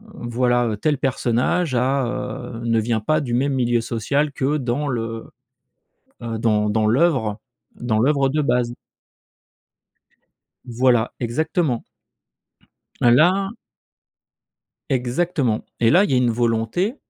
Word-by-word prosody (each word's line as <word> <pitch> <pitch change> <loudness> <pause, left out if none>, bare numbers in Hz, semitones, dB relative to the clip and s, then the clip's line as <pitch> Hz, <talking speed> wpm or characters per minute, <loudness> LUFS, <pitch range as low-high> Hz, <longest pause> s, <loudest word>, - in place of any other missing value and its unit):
voilà, 120 -1 0
heu: 105 - -3
«Tel 145 +7 0
personnage 130 +4 0
a, 130 +2 +1
heu, 120 -1 -5
ne 115 -1 +2
vient 110 -1 -1
pas 155 +8 +1
du 125 -4 -4
même 135 +3 +1
milieu 120 -2 +1
social 140 +7 -1
que 140 +2 0
dans 135 +2 -2
le, 115 -2 -4 1.0
heu, 115 -1 -3
dans 105 -2 +1
dans 110 0 +1
l'œuvre 120 -5 +2 0.4
dans 120 -3 -1
l'œuvre 135 +2 +2
de 150 +3 0
base». 125 -4 +1 1.9
Voilà, 120 -1 +1
exactement. 135 +1 -1 1.2
Et 120 - +5
là 185 +9 +4 1.4
Exactement 130 -1 0 0.2
et 115 - +4
là, 180 - +5
il 180 - -1
y - - +2
a - - +4
une 125 -1 +2
volonté 120 - 0
125 Hz, 125 wpm, -21 LUFS, 115-145 Hz, 1.9 s, Et